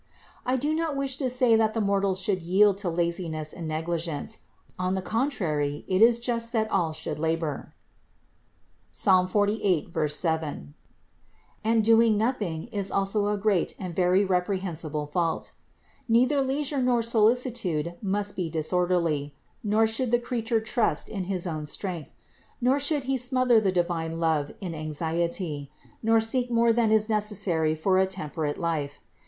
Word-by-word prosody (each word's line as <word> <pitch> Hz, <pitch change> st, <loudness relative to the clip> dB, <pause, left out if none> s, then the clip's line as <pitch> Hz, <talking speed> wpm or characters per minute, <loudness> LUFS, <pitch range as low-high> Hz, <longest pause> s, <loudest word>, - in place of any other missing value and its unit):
437. 250 Hz, -, 0 dB
I -, -, +3 dB
do 295 Hz, +4 st, 0 dB
not 315 Hz, -4 st, -2 dB
wish 270 Hz, -1 st, -1 dB
to 265 Hz, -3 st, -1 dB
say 250 Hz, -2 st, +4 dB
that 220 Hz, 0 st, +2 dB
the -, -, 0 dB
mortals 200 Hz, -2 st, +1 dB
should 190 Hz, -1 st, 0 dB
yield 195 Hz, +3 st, +3 dB
to 195 Hz, -3 st, -1 dB
laziness 170 Hz, -2 st, -2 dB
and 170 Hz, -2 st, -6 dB
negligence; 165 Hz, +4 st, -3 dB, 0.4 s
on 185 Hz, +1 st, 0 dB
the 190 Hz, -, -2 dB
contrary 175 Hz, -, -1 dB
it 185 Hz, +1 st, +1 dB
is 230 Hz, +1 st, +6 dB
just 235 Hz, -1 st, -2 dB
that 220 Hz, -1 st, 0 dB
all 170 Hz, -5 st, +1 dB
should 150 Hz, -1 st, -5 dB
labor 160 Hz, -2 st, -2 dB, 1.2 s
(Ps. -, -, -2 dB, 0.2 s
48, 205 Hz, -5 st, +1 dB, 0.2 s
7), 150 Hz, -, -2 dB, 0.9 s
and 225 Hz, 0 st, +2 dB
doing 225 Hz, -1 st, +5 dB
nothing 210 Hz, -8 st, -1 dB
is 200 Hz, -4 st, -1 dB
also 200 Hz, +1 st, +1 dB
a 210 Hz, 0 st, 0 dB
great 200 Hz, -3 st, 0 dB
and 180 Hz, -3 st, -6 dB
very 185 Hz, +2 st, +3 dB
reprehensible 180 Hz, -5 st, -2 dB
fault. 165 Hz, +2 st, -2 dB, 0.6 s
Neither 255 Hz, +5 st, +3 dB
leisure 275 Hz, +1 st, -1 dB
nor 245 Hz, -2 st, +2 dB
solicitude 225 Hz, -, +1 dB
must 205 Hz, 0 st, -1 dB
be 175 Hz, -3 st, -2 dB
disorderly; 165 Hz, -3 st, 0 dB, 0.3 s
nor 215 Hz, +1 st, +3 dB
should 225 Hz, +3 st, 0 dB
the 240 Hz, -, +4 dB
creature 235 Hz, -1 st, -1 dB
trust 220 Hz, -, 0 dB
in 195 Hz, -4 st, -4 dB
his 185 Hz, -1 st, -2 dB
own 155 Hz, -3 st, -4 dB
strength; 175 Hz, 0 st, -5 dB, 0.4 s
nor 260 Hz, +3 st, +2 dB
should 285 Hz, 0 st, +1 dB
he 265 Hz, 0 st, -1 dB
smother 250 Hz, -1 st, +3 dB
the 200 Hz, -3 st, +1 dB
divine 170 Hz, -2 st, -1 dB
love 160 Hz, -3 st, +1 dB
in 180 Hz, -4 st, -4 dB
anxiety; 160 Hz, -1 st, -2 dB, 0.3 s
nor 225 Hz, 0 st, +4 dB
seek 245 Hz, +3 st, +1 dB
more 235 Hz, -1 st, +3 dB
than 225 Hz, -2 st, +2 dB
is 215 Hz, -1 st, +3 dB
necessary 200 Hz, -7 st, 0 dB
for 185 Hz, +4 st, +2 dB
a 190 Hz, -, +3 dB
temperate 155 Hz, -5 st, -3 dB
life. 155 Hz, -4 st, -3 dB
195 Hz, 155 wpm, -26 LUFS, 165-230 Hz, 1.2 s, is